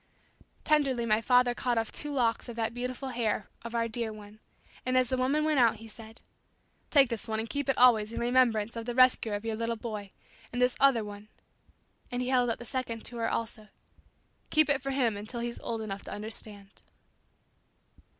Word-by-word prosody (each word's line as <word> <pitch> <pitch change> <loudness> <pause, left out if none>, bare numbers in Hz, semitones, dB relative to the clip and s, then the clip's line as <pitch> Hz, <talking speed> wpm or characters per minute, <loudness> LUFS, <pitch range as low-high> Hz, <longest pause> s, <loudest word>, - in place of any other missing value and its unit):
Tenderly 275 -6 +2
my 215 0 +2
father 250 +1 +4
cut 240 -1 -1
off 225 -1 -1
two 295 - -3
locks 240 -4 0
of 235 - -7
that 225 0 -2
beautiful 250 +2 -4
hair 225 -4 -1 0.2
of 235 0 -6
our 230 0 +1
dear 230 0 -2
one, 210 0 -12 0.4
and 255 0 +1
as 255 -1 +3
the 260 - +1
woman 265 +4 +1
went 305 -2 +2
out 235 -3 +5
he 225 - -11
said. 220 +1 -12 0.7
"Take 275 -4 +5
this 230 -3 -4
one 220 -1 -1
and 225 - -3
keep 285 +4 -3
it 270 - +2
always 225 -4 +5
in - - -4
remembrance 235 -3 +2
of 230 -1 -5
the 240 - -3
rescuer 250 -4 +4
of 205 +2 -6
your 225 -1 -1
little 230 +1 -2
boy; 215 -3 -6 0.4
and 245 - -3
this 250 0 +3
other 270 -5 +4
one," 205 0 -9 0.8
and 245 0 -2
he 250 - -3
held 250 -2 +3
out 230 - -1
the 240 - -10
second 235 -2 -4
to 240 - -4
her 230 -1 0
also, 225 -1 -4 0.8
"keep 310 -1 +4
it 280 -2 +2
for 275 - -4
him 255 -5 +1
until 215 +4 -2
he's 235 0 -4
old 225 -1 -4
enough 200 -2 -6
to - - -8
understand." 210 -1 -4
235 Hz, 205 wpm, -29 LUFS, 220-255 Hz, 0.8 s, out